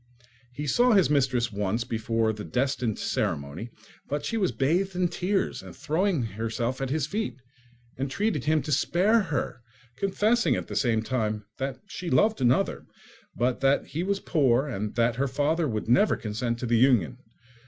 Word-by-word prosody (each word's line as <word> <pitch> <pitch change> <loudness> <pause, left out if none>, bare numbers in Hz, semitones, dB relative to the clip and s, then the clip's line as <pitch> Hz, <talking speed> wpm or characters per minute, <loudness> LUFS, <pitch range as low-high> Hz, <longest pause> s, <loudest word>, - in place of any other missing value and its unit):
He 145 +4 -5
saw 240 - +4
his 190 -7 +4
mistress 125 -4 +1
once 105 +3 -1
before 115 -1 0
the 105 0 -7
destined 125 -3 -1
ceremony; 70 +11 -2 0.4
but 145 +1 -3
she 225 - -2
was 195 -5 +1
bathed 180 +8 0
in 180 -1 +1
tears, 185 +3 -1
and - - -11
throwing 160 +1 0
herself 115 +4 -3
at 135 - -2
his 150 0 0
feet, 150 - -3 0.6
entreated 145 - -1
him 155 -2 +2
to 150 - -4
spare 190 - +3
her, 150 - -3 0.4
confessing 210 - +2
at - - -3
the - - -5
same 115 -4 +1
time 110 -4 -2
that 135 0 -3
she 180 -3 -6
loved 215 0 +3
another, 125 0 +1 0.5
but 125 +1 0
that 135 +1 +3
he 160 - -3
was 195 +2 0
poor, 135 -5 +2
and 105 -5 -4
that 115 0 +2
her 140 +1 +1
father 150 +5 0
would 110 -4 -3
never 130 - +4
consent 115 +2 -3
to 125 - -4
the 120 -1 +2
union. 115 - +3
135 Hz, 170 wpm, -27 LUFS, 115-170 Hz, 0.6 s, saw